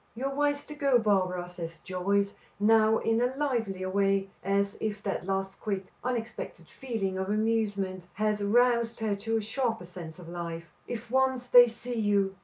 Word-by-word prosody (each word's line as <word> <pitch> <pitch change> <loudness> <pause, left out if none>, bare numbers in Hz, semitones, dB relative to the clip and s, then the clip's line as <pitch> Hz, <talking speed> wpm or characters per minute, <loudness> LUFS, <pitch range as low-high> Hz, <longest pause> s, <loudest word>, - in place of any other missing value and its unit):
"You 250 +4 -4
are 275 - -1
wise 290 0 +1
to 300 - -8
go, 280 -3 +3
Barbara," 185 -5 +1
says 170 -2 -7
Joyce, 200 +2 0 0.3
now 220 +1 +5
in 225 +1 +1
a 250 +2 +1
livelier 225 -10 -1
way, 195 0 +1
as 200 +1 +1
if 210 -1 -3
that 195 -2 -3
last 195 0 -2
quick, 195 -3 -2 0.2
unexpected 240 -2 -4
feeling 205 -7 -3
of 190 +1 -2
amusement 205 -4 0
has 210 0 0
roused 235 +2 +3
her 215 -2 +1
to 225 +2 -1
a - - 0
sharper 225 -2 -1
sense 175 -2 -9
of 180 -2 -11
life. 170 -1 -5 0.2
"If 230 -1 -6
once 260 -1 +1
they 245 -1 +9
see 235 +1 -5
you! 200 -2 +2
210 Hz, 175 wpm, -29 LUFS, 195-235 Hz, 0.3 s, they